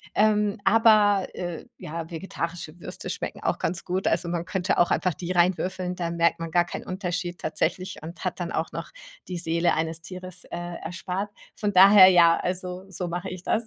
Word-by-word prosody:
ähm, 210 0 +3
aber, 210 -2 +5
äh, 175 -2 -5
ja, 165 +1 -6
vegetarische 170 -1 -5
Würste - - -5
schmecken - - -5
auch - - 0
ganz 170 +1 -1
gut. 185 +2 -1
Also, 170 +1 +1
man 170 -1 -2
könnte 185 0 0
auch 175 - +4
einfach 185 - +1
die 175 +4 -5
rein 175 +1 +4
würfeln, 185 -1 -3
da 175 -2 -2
merkt 170 0 +1
man 165 0 -4
gar 175 +1 +3
keinen - - -7
Unterschied 180 -2 -3
tatsächlich 175 +4 -2
und 170 +4 -9
hat 185 - -2
dann 175 -1 -3
auch 160 0 -2
noch - - -6 0.4
die 180 - -4
Seele 170 0 +1
eines 160 +1 -2
Tieres, 185 0 -9
äh, - - -6 0.3
erspart. 180 +4 -4 0.3
Von 205 -1 -2
daher, 195 +1 +9
ja, 170 -2 +6
also, 180 0 -4
so 180 -1 -4
mache 175 +2 -4
ich 185 -1 -8
das. 225 +4 0
180 Hz, 195 wpm, -25 LUFS, 170-190 Hz, 0.4 s, daher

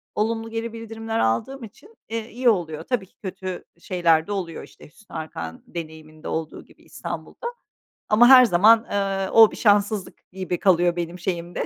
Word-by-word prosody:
Olumlu 225 +1 -1
geri 225 0 -4
bildirimler 225 0 -5
aldığım 235 - -1
için, 245 - -14
eee, 225 0 -4
iyi 245 +1 +2
oluyor. 160 -6 -1
Tabii 245 -4 -2
ki - - -35
kötü 185 -1 -6
şeyler 170 -3 +1
de - - -6
oluyor, 180 -5 -4
işte, - - -15
Hüsnü 195 +6 -17
Arkan 85 - -7
deneyiminde 155 -2 -9
olduğu 160 -1 -5
gibi - - -23
İstanbul'da 475 - -7 0.6
ama 225 +3 +6
her 255 -2 +9
zaman, 220 +4 +5
eee, 195 -1 -1
o 225 -1 +7
bir - - -9
şanssızlık 205 -2 0
gibi 185 -1 -4
kalıyor 175 -2 +3
benim 175 +1 -5
şeyimde, 175 -1 -3
195 Hz, 165 wpm, -23 LUFS, 170-225 Hz, 0.6 s, her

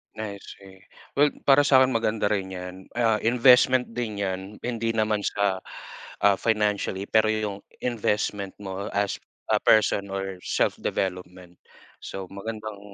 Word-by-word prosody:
I 105 -2 -5
see. 95 -1 -13 0.4
Well, 145 +1 +4
para 145 +1 +5
sa'kin 130 -1 +5
maganda 110 -3 0
rin 95 -2 -1
yan, 90 0 -6 0.2
ah, 115 -3 +2
investment 125 +1 +4
din 115 -4 -4
yan. 95 -1 -2 0.2
Hindi 115 -1 -2
naman 110 -1 +1
sa, 100 -2 0 0.6
ah, 100 -1 +5
financially 105 -3 0
pero 110 0 +4
yung 105 -2 -2 0.2
investment 105 -4 -1
mo 95 0 -5
as 100 -1 0 0.3
a - - +4
person 100 -2 +3
or 95 -1 -4
self-development. 90 -1 -2 0.4
So, 95 -1 -6
magandang 110 +1 -6
105 Hz, 130 wpm, -25 LUFS, 95-115 Hz, 0.6 s, para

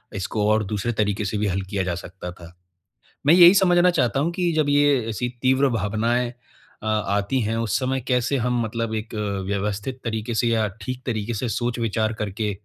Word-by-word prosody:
इसको 105 +2 -1
और 110 0 +2
दूसरे 105 +4 -2
तरीक़े 105 -1 0
से 105 - -2
भी 105 0 0
हल 95 0 -1
किया 100 -1 -1
जा 90 -1 -2
सकता 90 +1 -8
था। 85 -1 -13 0.7
मैं 155 - +8
यही 175 +1 +9
समझना 180 -2 +5
चाहता 135 -5 +1
हूँ 170 +3 0
कि 175 -1 0
जब 155 -2 +1
ये 145 -2 +4
ऐसी 115 +3 -2
तीव्र 130 +2 +3
भावनाएँ 115 +3 0 0.5
अ, - - -4
आती 105 +2 0
हैं, 110 0 -1
उस 115 -4 0
समय 130 0 -1
कैसे 125 +2 +1
हम 125 0 0
मतलब 115 0 -3
एक, 110 +1 -5 0.3
व्यवस्थित 100 +5 -3
तरीक़े 110 0 -3
से 120 - +2
या 110 -2 +2
ठीक 125 +4 -5
तरीक़े 115 -2 -2
से 115 +2 -2
सोच-विचार 115 -2 -1
करके 105 +1 -2
115 Hz, 190 wpm, -23 LUFS, 105-130 Hz, 0.7 s, यही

